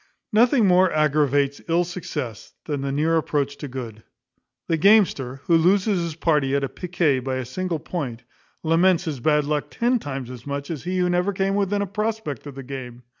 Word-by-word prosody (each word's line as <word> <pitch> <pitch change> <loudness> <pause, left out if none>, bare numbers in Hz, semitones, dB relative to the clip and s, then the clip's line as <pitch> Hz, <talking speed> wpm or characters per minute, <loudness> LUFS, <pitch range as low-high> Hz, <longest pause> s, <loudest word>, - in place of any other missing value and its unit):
Nothing 235 +1 +4
more 185 -1 +4
aggravates 145 -2 +2
ill 170 +2 +3
success 150 - -6
than 145 -2 -3
the 140 0 -2
near 155 +4 +2
approach 145 -3 -1
to 145 - -6
good. 120 -4 -7 0.7
The 165 - +2
gamester, 160 - +3
who 170 - +3
loses 185 +3 +3
his 165 -2 -4
party 150 -5 +1
at 140 -2 -2
piquet 170 -6 +1
by 130 +1 -3
a 130 -1 -3
single 175 +6 -3
point, 135 -7 -5 0.4
laments 170 +2 +3
his 155 -7 -4
bad 150 +3 +2
luck 150 0 -1
ten 240 +1 +1
times 135 - -5
as 125 +1 -10
much 140 +2 -4
as 155 -1 -6
he 185 +1 -1
who 180 -1 +2
never 180 +2 +1
came 195 +1 0
within 200 0 +1
a - - -1
prospect 210 - -3
of 140 - -9
the 135 - -7
game. 125 -2 -8
155 Hz, 190 wpm, -23 LUFS, 135-180 Hz, 0.7 s, Nothing